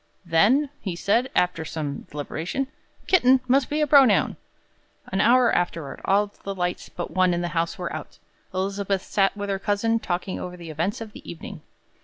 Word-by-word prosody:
'Then,' 220 Hz, -, +3 dB
he 185 Hz, -4 st, -4 dB
said, 230 Hz, +8 st, +1 dB
after 180 Hz, -2 st, +1 dB
some 150 Hz, -3 st, -5 dB
deliberation, 160 Hz, -, -3 dB, 0.4 s
'kitten 265 Hz, -8 st, +5 dB
must 265 Hz, +1 st, +3 dB
be 300 Hz, +1 st, 0 dB
a -, -, +4 dB
pronoun.'" 270 Hz, -6 st, +5 dB, 0.8 s
An 190 Hz, +1 st, +1 dB
hour 245 Hz, +1 st, +5 dB
afterward, 165 Hz, -4 st, -2 dB
all 205 Hz, +1 st, +2 dB
the 195 Hz, 0 st, -4 dB
lights 180 Hz, -1 st, -2 dB
but 175 Hz, -, -6 dB
one 185 Hz, -1 st, +3 dB
in 175 Hz, -, -1 dB
the 175 Hz, -, -2 dB
house 165 Hz, -1 st, -1 dB
were -, -, -4 dB
out. -, -, -8 dB, 0.3 s
Elizabeth 195 Hz, 0 st, -1 dB
sat 195 Hz, 0 st, +1 dB
with 205 Hz, 0 st, -3 dB
her 195 Hz, -, -1 dB
cousin 215 Hz, +3 st, +1 dB
talking 180 Hz, -1 st, -3 dB
over 180 Hz, 0 st, -6 dB
the 170 Hz, -2 st, -8 dB
events 170 Hz, +9 st, -2 dB
of 220 Hz, -2 st, -7 dB
the -, -, -10 dB
evening. 165 Hz, -, -9 dB
195 Hz, 180 wpm, -24 LUFS, 175-230 Hz, 0.8 s, kitten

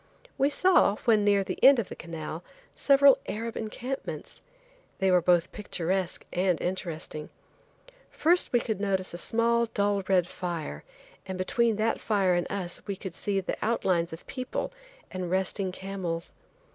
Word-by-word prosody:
We 275 Hz, -, +3 dB
saw, 360 Hz, -, +4 dB
when 220 Hz, -3 st, +4 dB
near 200 Hz, -1 st, +4 dB
the -, -, -6 dB
end 270 Hz, 0 st, +9 dB
of 225 Hz, -5 st, -2 dB
the -, -, -7 dB
canal, 165 Hz, 0 st, -6 dB, 0.3 s
several 275 Hz, -1 st, +6 dB
Arab 230 Hz, +2 st, -4 dB
encampments. 250 Hz, +5 st, -5 dB, 0.6 s
They 190 Hz, -1 st, +2 dB
were 180 Hz, -1 st, +5 dB
both 175 Hz, -1 st, +3 dB
picturesque 185 Hz, -2 st, -2 dB
and 180 Hz, -2 st, +1 dB
interesting. 165 Hz, -4 st, -4 dB, 0.8 s
First 350 Hz, +3 st, +2 dB
we 240 Hz, -3 st, +2 dB
would 215 Hz, -3 st, -1 dB
notice 190 Hz, -3 st, 0 dB
a 175 Hz, -, -5 dB
small 235 Hz, +2 st, +2 dB
dull 205 Hz, -2 st, 0 dB
red 185 Hz, -3 st, +3 dB
fire, 175 Hz, -3 st, -5 dB, 0.4 s
and 190 Hz, -1 st, -4 dB
between 225 Hz, +5 st, +1 dB
that 220 Hz, +2 st, 0 dB
fire 195 Hz, -4 st, +2 dB
and 175 Hz, 0 st, -1 dB
us 180 Hz, -3 st, -3 dB
we 200 Hz, -, -2 dB
could 190 Hz, -2 st, -7 dB
see 195 Hz, +2 st, -1 dB
the 185 Hz, -, -4 dB
outlines 185 Hz, -7 st, +1 dB
of 160 Hz, -, -9 dB
people 255 Hz, -, -4 dB, 0.4 s
and 185 Hz, -2 st, -4 dB
resting 190 Hz, +1 st, -1 dB
camels. 185 Hz, -3 st, -5 dB
195 Hz, 155 wpm, -28 LUFS, 180-225 Hz, 0.8 s, end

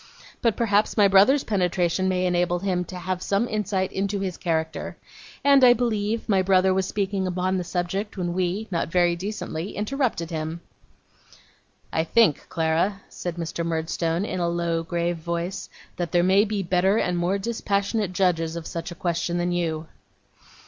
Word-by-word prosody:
But 230 Hz, -4 st, +2 dB
perhaps 215 Hz, -2 st, +2 dB
my 205 Hz, -2 st, +6 dB
brother's 200 Hz, +9 st, +5 dB
penetration 185 Hz, -2 st, +1 dB
may 185 Hz, 0 st, +1 dB
enable 175 Hz, 0 st, +1 dB
him 180 Hz, -1 st, -1 dB
to 185 Hz, -, -9 dB
have 180 Hz, 0 st, -3 dB
some 200 Hz, +6 st, 0 dB
insight 200 Hz, -3 st, -1 dB
into 200 Hz, +1 st, -1 dB
his 190 Hz, -2 st, -3 dB
character. 160 Hz, -2 st, -2 dB, 0.5 s
And 280 Hz, -1 st, +6 dB
I 245 Hz, -1 st, +9 dB
believe 220 Hz, -2 st, -1 dB
my 195 Hz, -3 st, +3 dB
brother 185 Hz, 0 st, +3 dB
was 190 Hz, 0 st, 0 dB
speaking 195 Hz, -2 st, -1 dB
on 185 Hz, +1 st, 0 dB
the 180 Hz, -, -2 dB
subject 190 Hz, +4 st, -3 dB
when 175 Hz, -2 st, -2 dB
we 185 Hz, +4 st, -1 dB
not 170 Hz, -, 0 dB
very 175 Hz, 0 st, +3 dB
decently 185 Hz, -2 st, -5 dB
interrupted 210 Hz, -, -1 dB
him.' 160 Hz, +1 st, -4 dB, 1.3 s
'I 160 Hz, -, +2 dB
think, 175 Hz, -5 st, +3 dB
Clara,' 170 Hz, +4 st, 0 dB
said 175 Hz, -2 st, -5 dB
Mr. 170 Hz, 0 st, -4 dB
Murdstone, 165 Hz, +2 st, -1 dB
in 185 Hz, -, -3 dB
a 170 Hz, -1 st, +1 dB
low 170 Hz, -1 st, -1 dB
grave 170 Hz, +1 st, -2 dB
voice, 170 Hz, +3 st, -4 dB, 0.3 s
'that 175 Hz, -2 st, -3 dB
there 175 Hz, -1 st, +4 dB
may 195 Hz, +3 st, +4 dB
be 205 Hz, -2 st, -2 dB
better 185 Hz, +3 st, +2 dB
and 180 Hz, -5 st, 0 dB
more 175 Hz, +3 st, +1 dB
dispassionate 200 Hz, -1 st, -1 dB
judges 170 Hz, -3 st, +1 dB
of 170 Hz, -1 st, -6 dB
such 165 Hz, +1 st, -5 dB
a 175 Hz, -, -8 dB
question 175 Hz, -1 st, -1 dB
than 175 Hz, 0 st, 0 dB
you. 165 Hz, -2 st, -1 dB
185 Hz, 170 wpm, -24 LUFS, 170-200 Hz, 1.3 s, I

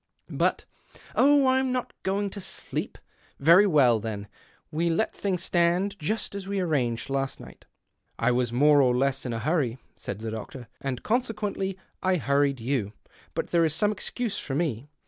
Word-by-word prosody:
But -, -, 0 dB, 0.2 s
" -, -, -22 dB
" -, -, -20 dB
Oh, 285 Hz, 0 st, +5 dB
I'm 260 Hz, 0 st, +2 dB
not 250 Hz, -1 st, -2 dB
going 200 Hz, +1 st, -1 dB
to 200 Hz, -, -6 dB
sleep. -, -, -4 dB, 0.4 s
Very 170 Hz, +8 st, +6 dB
well, 130 Hz, -, +4 dB
then 105 Hz, -1 st, -5 dB, 0.2 s
— -, -, -34 dB
we 165 Hz, +3 st, 0 dB
let 170 Hz, +7 st, 0 dB
things 185 Hz, -3 st, -2 dB
stand 180 Hz, +4 st, +1 dB
just 215 Hz, +9 st, -2 dB
as 200 Hz, -1 st, -6 dB
we 200 Hz, 0 st, -1 dB
arranged 130 Hz, -10 st, 0 dB
last 135 Hz, 0 st, -1 dB
night." -, -, -13 dB, 0.3 s
" -, -, -52 dB
I 115 Hz, +2 st, +2 dB
was 120 Hz, -1 st, +1 dB
more 145 Hz, +4 st, +5 dB
or 125 Hz, -2 st, +3 dB
less 135 Hz, 0 st, 0 dB
in -, -, -3 dB
a -, -, -2 dB
hurry," 130 Hz, -1 st, 0 dB, 0.2 s
said 100 Hz, -, -6 dB
the 110 Hz, +1 st, -5 dB
doctor, 110 Hz, +3 st, -7 dB
"and 130 Hz, -3 st, -3 dB
consequently 210 Hz, -5 st, -1 dB, 0.2 s
I 185 Hz, 0 st, +2 dB
hurried 140 Hz, -3 st, +1 dB
you. 115 Hz, -4 st, -1 dB, 0.4 s
But -, -, -3 dB
there 170 Hz, -1 st, +4 dB
is 155 Hz, -2 st, +1 dB
some 205 Hz, +6 st, +2 dB
excuse 215 Hz, +1 st, -3 dB
for 135 Hz, -, -4 dB
me. 145 Hz, -4 st, -2 dB
155 Hz, 185 wpm, -27 LUFS, 125-195 Hz, 0.4 s, Very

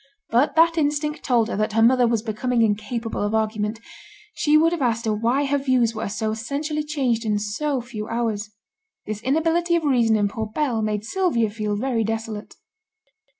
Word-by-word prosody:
But 255 Hz, +8 st, +2 dB
that 330 Hz, +1 st, +4 dB
instinct 300 Hz, 0 st, -1 dB
told 235 Hz, -4 st, +2 dB
her -, -, -3 dB
that 215 Hz, 0 st, -1 dB
her 225 Hz, -, +3 dB
mother 250 Hz, +1 st, +5 dB
was 230 Hz, -2 st, 0 dB
becoming 235 Hz, +2 st, 0 dB
incapable 220 Hz, +2 st, -2 dB
of 205 Hz, +1 st, 0 dB
argument, 215 Hz, 0 st, -1 dB, 0.5 s
she 300 Hz, 0 st, +3 dB
would 325 Hz, +2 st, +4 dB
have 345 Hz, -3 st, -2 dB
asked 230 Hz, -2 st, 0 dB
her 220 Hz, -, +1 dB
why 235 Hz, +7 st, +1 dB
her 285 Hz, +1 st, +1 dB
views 255 Hz, -4 st, +2 dB
were 215 Hz, -, -4 dB
so 215 Hz, +1 st, -2 dB
essentially 285 Hz, +7 st, -3 dB
changed 265 Hz, -7 st, -1 dB
in 210 Hz, -2 st, 0 dB
so 245 Hz, +7 st, -2 dB
few 225 Hz, -3 st, -7 dB
hours. 225 Hz, -3 st, -2 dB, 0.6 s
This 215 Hz, 0 st, -5 dB
inability 330 Hz, +6 st, +1 dB
of 335 Hz, -, 0 dB
reason 240 Hz, -6 st, +3 dB
in 205 Hz, -1 st, +2 dB
poor 220 Hz, +2 st, -4 dB
Bell 235 Hz, 0 st, -1 dB
made 210 Hz, -1 st, -2 dB
Sylvia 240 Hz, -, 0 dB
feel 210 Hz, -1 st, -2 dB
very 235 Hz, +1 st, 0 dB
desolate. 220 Hz, -1 st, -4 dB
230 Hz, 185 wpm, -23 LUFS, 215-285 Hz, 0.6 s, mother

